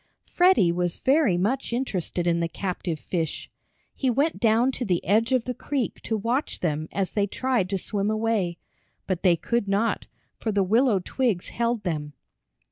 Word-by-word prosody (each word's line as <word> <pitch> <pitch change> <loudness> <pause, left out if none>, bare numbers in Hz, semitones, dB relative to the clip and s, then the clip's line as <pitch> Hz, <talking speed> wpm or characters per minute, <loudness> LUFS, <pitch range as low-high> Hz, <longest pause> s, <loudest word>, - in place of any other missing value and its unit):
Freddie 355 - +4
was 175 0 -1
very 270 - +3
much 235 +10 -1
interested 190 -8 -2
in 170 -1 +2
the 170 - 0
captive 180 -2 -3
fish. 165 -4 -3 0.4
He 265 - 0
went 280 +7 +1
down 230 +3 +3
to 255 - -4
the 180 -6 0
edge 220 +6 +2
of 255 -3 +3
the 250 - -3
creek 270 0 -3
to 220 - -2
watch 235 +7 -2
them 155 -2 -1
as 195 -2 -1
they 205 -1 +1
tried 245 -3 0
to 195 - 0
swim 200 +2 -2
away. 215 -5 0 0.5
But 185 -2 -2
they 180 -3 +5
could 235 +5 -1
not, 205 +4 0 0.3
for 220 - -1
the 200 -1 +2
willow 220 +1 +3
twigs 235 -9 0
held 235 -2 -1
them. 150 -4 -3
210 Hz, 175 wpm, -25 LUFS, 180-240 Hz, 0.5 s, they